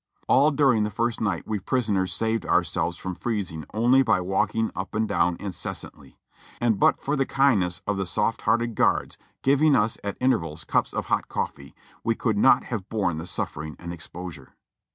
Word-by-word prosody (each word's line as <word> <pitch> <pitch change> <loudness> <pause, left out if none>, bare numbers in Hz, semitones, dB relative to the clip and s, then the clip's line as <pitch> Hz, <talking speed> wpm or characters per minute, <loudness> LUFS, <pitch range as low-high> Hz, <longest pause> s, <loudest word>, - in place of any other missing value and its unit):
All 140 +3 +5
during 135 -6 +3
the 105 - -1
first 115 +2 -1
night 100 -6 -1
we 110 -2 -2
prisoners 100 -4 0
saved 115 0 -1
ourselves - - 0
from 95 - -5
freezing 90 - -3
only 120 +5 +4
by 125 - +3
walking 95 +4 0
up 95 +2 -5
and 110 +1 +1
down 85 -3 +1
incessantly; 95 -5 -6 0.4
and 115 -4 +1
but - - +4
for 145 - -1
the 135 - +2
kindness 105 -11 +2
of 105 -1 -1
the 95 -2 -2
soft 100 +6 0
hearted 115 0 +1
guards, - - +1 0.2
giving 140 +2 +4
us 110 0 +1
at 100 -1 -4
intervals 85 -12 0
cups - - 0
of - - -3
hot - - 0
cofTee, 70 0 -4 0.3
we - - +1
could - - 0
not - - +5
have 105 -2 -5
borne 90 -7 -1
the 85 - -6
suffering 75 -2 -4
and 85 0 -7
exposure. 85 -4 -9
105 Hz, 180 wpm, -25 LUFS, 90-120 Hz, 0.4 s, All